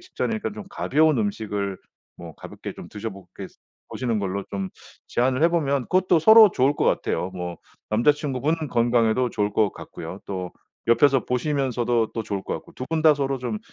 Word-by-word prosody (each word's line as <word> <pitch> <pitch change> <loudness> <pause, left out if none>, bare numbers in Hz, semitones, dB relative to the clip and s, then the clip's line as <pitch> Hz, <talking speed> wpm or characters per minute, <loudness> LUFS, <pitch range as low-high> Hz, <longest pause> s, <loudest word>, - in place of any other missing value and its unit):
직전이니까 225 - -3
좀 210 -1 -8
가벼운 155 -4 +2
음식을 100 -2 -2 0.4
뭐 85 -2 -10
가볍게 - - -8
좀 - - -10
드셔보게 100 -3 -8 0.4
보시는 120 -4 -1
걸로 100 0 -3
좀 95 -1 -3 0.4
제안을 130 +4 +1
해 165 - +6
보면 140 -6 0
그것도 185 +1 +3
서로 220 +4 +8
좋을 135 +3 +2
것 - - 0
같아요. 90 - 0
뭐 90 -1 -5 0.3
남자친구분 145 +5 +1
건강에도 120 0 +2
좋을 105 -2 -1
것 105 -1 +2
같고요. 85 +4 -9
또 90 -2 -5 0.4
옆에서 130 +3 +4
보시면서도 125 -4 0
또 115 - -3
좋을 100 -2 -4
것 - - -5
같고 - - -9
2 130 - -5
분 160 -1 0
다 155 -2 +7
서로 135 -1 -1
좀 130 +12 -3
120 Hz, 350 characters per minute, -24 LUFS, 100-145 Hz, 0.4 s, 서로